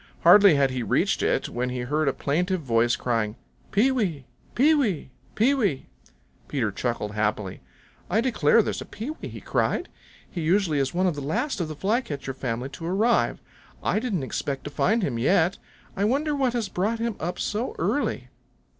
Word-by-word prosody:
Hardly 195 Hz, 0 st, +8 dB
had 140 Hz, -2 st, +3 dB
he 130 Hz, -1 st, -2 dB
reached 115 Hz, -, +1 dB
it -, -, +1 dB
when 125 Hz, +1 st, -2 dB
he 125 Hz, 0 st, -3 dB
heard 150 Hz, +5 st, 0 dB
a -, -, +4 dB
plaintive 180 Hz, +5 st, 0 dB
voice 120 Hz, -3 st, +2 dB
crying, 115 Hz, -3 st, -1 dB, 0.4 s
"Pee 230 Hz, +6 st, +4 dB
wee! 180 Hz, -, -1 dB, 0.3 s
Pee 295 Hz, +6 st, +5 dB
wee! 205 Hz, -, 0 dB, 0.2 s
Pee 245 Hz, +6 st, +4 dB
wee!" 205 Hz, -, 0 dB, 0.6 s
Peter 120 Hz, -7 st, -1 dB
chuckled 110 Hz, 0 st, -2 dB
happily. 105 Hz, -2 st, -2 dB, 0.5 s
"I 210 Hz, -, +2 dB
declare, 230 Hz, -, +3 dB
there's -, -, -3 dB
Pee 230 Hz, +8 st, -5 dB
wee," 315 Hz, -, -8 dB
he -, -, -8 dB
cried. -, -, -1 dB, 0.4 s
"He 175 Hz, -, -5 dB
usually 165 Hz, -2 st, +2 dB
is 135 Hz, -1 st, 0 dB
one 185 Hz, +2 st, +1 dB
of 180 Hz, -, +2 dB
the 145 Hz, -, -6 dB
last 170 Hz, -, -1 dB
of 165 Hz, -, -1 dB
the 155 Hz, -, -6 dB
Flycatcher 150 Hz, -, -2 dB
family 125 Hz, 0 st, -3 dB
to 165 Hz, +4 st, -8 dB
arrive. 215 Hz, +7 st, +1 dB, 0.4 s
I -, -, +1 dB
didn't 215 Hz, -, -2 dB
expect 135 Hz, +1 st, -3 dB
to 145 Hz, -, -6 dB
find 220 Hz, +8 st, +1 dB
him 120 Hz, -8 st, -1 dB
yet. 175 Hz, +7 st, +2 dB, 0.4 s
I 200 Hz, -, +1 dB
wonder 290 Hz, +6 st, +1 dB
what 265 Hz, -4 st, +1 dB
has 235 Hz, -4 st, -1 dB
brought 205 Hz, +5 st, -1 dB
him 230 Hz, -1 st, -2 dB
up 175 Hz, +2 st, -3 dB
so 230 Hz, -, -2 dB
early." -, -, -1 dB
170 Hz, 180 wpm, -25 LUFS, 135-220 Hz, 0.6 s, Hardly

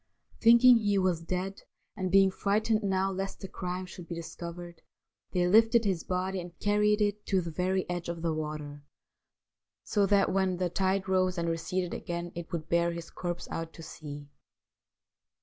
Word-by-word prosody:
Thinking 235 Hz, +2 st, +8 dB
he 205 Hz, -2 st, +1 dB
was 185 Hz, -3 st, +1 dB
dead, 185 Hz, +3 st, -3 dB, 0.3 s
and 185 Hz, -1 st, -2 dB
being 195 Hz, 0 st, +6 dB
frightened 215 Hz, +3 st, +1 dB
now 195 Hz, -1 st, +1 dB
lest 195 Hz, +1 st, -4 dB
the 190 Hz, -, -5 dB
crime 180 Hz, 0 st, -4 dB
should 180 Hz, -1 st, -10 dB
be 170 Hz, -, -5 dB
discovered, 170 Hz, +1 st, -8 dB, 0.5 s
they 180 Hz, -2 st, +2 dB
lifted 225 Hz, +4 st, +5 dB
his 185 Hz, -5 st, 0 dB
body 185 Hz, +1 st, -2 dB
and 175 Hz, 0 st, -11 dB
carried 210 Hz, +1 st, +2 dB
it 205 Hz, 0 st, 0 dB
to 195 Hz, -, +2 dB
the 170 Hz, -2 st, -4 dB
very 185 Hz, +3 st, 0 dB
edge 175 Hz, -1 st, -4 dB
of 170 Hz, -1 st, -5 dB
the 165 Hz, -2 st, +1 dB
water, 150 Hz, -2 st, -5 dB, 1.0 s
so 205 Hz, -2 st, +1 dB
that 200 Hz, -1 st, +3 dB
when 190 Hz, -1 st, +1 dB
the 180 Hz, -1 st, -1 dB
tide 190 Hz, +1 st, 0 dB
rose 185 Hz, -1 st, +2 dB
and 170 Hz, 0 st, -1 dB
receded 175 Hz, +2 st, -2 dB
again 170 Hz, 0 st, -4 dB
it 170 Hz, -1 st, -7 dB
would 165 Hz, -2 st, -4 dB
bear 170 Hz, 0 st, +2 dB
his 170 Hz, -1 st, -7 dB
corpse 175 Hz, -1 st, -4 dB
out 165 Hz, 0 st, -4 dB
to 165 Hz, -, -11 dB
sea. 145 Hz, -2 st, -9 dB
185 Hz, 175 wpm, -29 LUFS, 170-195 Hz, 1.0 s, Thinking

